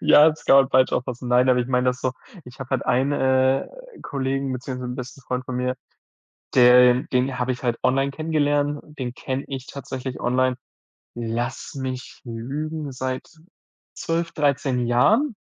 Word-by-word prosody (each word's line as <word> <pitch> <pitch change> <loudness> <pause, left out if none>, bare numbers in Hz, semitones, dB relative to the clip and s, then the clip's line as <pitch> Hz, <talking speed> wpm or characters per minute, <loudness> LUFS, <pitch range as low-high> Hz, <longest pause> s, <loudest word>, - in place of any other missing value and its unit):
Ja, 150 +2 +7
das 155 - -11
kann 135 - +6
man 135 -1 +5
falsch 130 0 +4
auffassen. 125 0 -3
Nein, 125 +1 +4
aber 125 - +4
ich 120 - -2
meine 125 0 +1
das 125 0 0
so: 130 - -1 0.3
Ich 125 +2 -14
habe 130 - -7
halt 130 -3 -1
einen, 130 +3 +2
äh, 130 -1 +2 0.4
Kollegen 135 0 -2
beziehungsweise 125 -1 -5
'n - - -7
besten 130 +3 -8
Freund 125 +1 -3
von 130 -1 -5
mir, 125 0 -1 0.8
der 125 0 +7
den 130 +1 +1
habe 125 +1 0
ich 125 - -6
halt 120 -2 0
online 135 +2 +2
kennengelernt, 145 -1 0 0.2
den 125 -2 -3
kenne 130 +2 -4
ich 135 -1 -6
tatsächlich 130 -2 -6
online, 130 +1 +1 0.6
lass 120 +2 -4
mich 130 -2 -6
lügen, 140 +6 -5
seit 130 0 -4 0.7
12, 165 0 -2
13 130 -4 0
Jahren. 220 - +3
130 Hz, 165 wpm, -23 LUFS, 125-140 Hz, 0.8 s, Ja